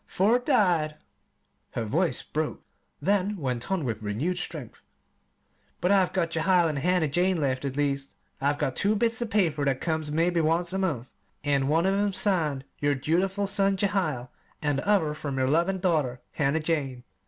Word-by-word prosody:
Four 215 +6 +3
died," 180 - +2 0.8
her 115 - -2
voice 165 - 0
broke, 155 0 -3 0.4
then 200 +1 +1
went 125 -2 -3
on 185 -7 0
with 115 -3 -3
renewed 130 - -1
strength, 150 -9 -6 1.0
"but 180 +3 +1
I've 190 -2 +4
got 170 -3 0
Jehiel 170 +1 +3
and 145 -2 -2
Hannah 180 +1 +2
Jane 180 +4 +1
left; 135 -2 -1
at 135 0 -3
least, 140 -1 -1 0.3
I've 145 +1 +1
got 140 -3 -1
two 205 +1 +2
bits 230 +2 0
of 235 - -2
paper 170 -9 +1
that 135 -2 +1
comes 160 -3 -1
mebbe 170 +3 +2
once 170 +3 +1
a 190 - -1
month, 145 -10 -2 0.3
an' 140 -2 +1
one 160 +4 +2
of 190 - +3
'em's 200 -1 +1
signed 155 -9 +1
'your 145 0 +1
dutiful 185 +8 0
son, 195 0 +1
Jehiel,' 180 -11 -1 0.3
an' 145 -2 0
the 140 - -4
other, 165 -8 +3
'from 145 -2 -5
your 130 0 +1
loving 170 +7 +2
daughter, 155 -9 0
Hannah 150 +1 0
Jane.'" 140 -6 -2
160 Hz, 175 wpm, -27 LUFS, 140-190 Hz, 1.0 s, I've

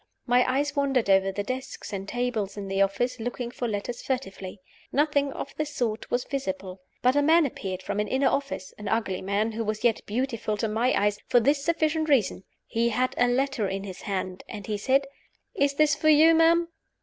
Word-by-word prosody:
My 245 0 +4
eyes 285 +2 0
wandered 270 -7 +2
over 195 0 +4
the 205 +1 -3
desks 255 -2 -6
and 195 0 -4
tables 230 -5 -2
in 200 -1 -5
the 195 0 0
office, 240 +6 0
looking 240 +1 -4
for 245 - -3
letters 220 +3 -4
furtively. 200 -7 -4 0.3
Nothing 285 -1 +2
of 280 - -7
the 305 - +1
sort 245 -7 -3
was 245 0 0
visible. 190 -8 -4 0.2
But 255 +2 +4
a 290 - +4
man 320 +2 +5
appeared 190 -8 -5
from - - -3
an 210 - 0
inner 265 +1 +1
office: 275 -9 -2
an 210 - -6
ugly 200 -5 -1
man, 200 +3 0
who 225 +1 -3
was 215 0 -3
yet 235 -3 +2
beautiful 230 -2 -2
to 220 - -1
my 225 +4 +1
eyes, 205 0 +1
for 245 - +5
this 280 +4 +2
sufficient 315 -1 +1
reason 220 -8 +2 0.2
he 235 +1 0
had 250 +3 0
a 245 - +3
letter 255 -3 0
in 195 0 -3
his 190 -2 -8
hand, 185 -2 -4
and 205 -3 -7
he 210 - -2
said, 265 +7 +2 0.5
"Is 280 0 +1
this 300 0 +4
for 310 +2 +2
you, 310 +2 +7
ma'am?" 335 +1 +4
245 Hz, 205 wpm, -26 LUFS, 205-275 Hz, 0.5 s, you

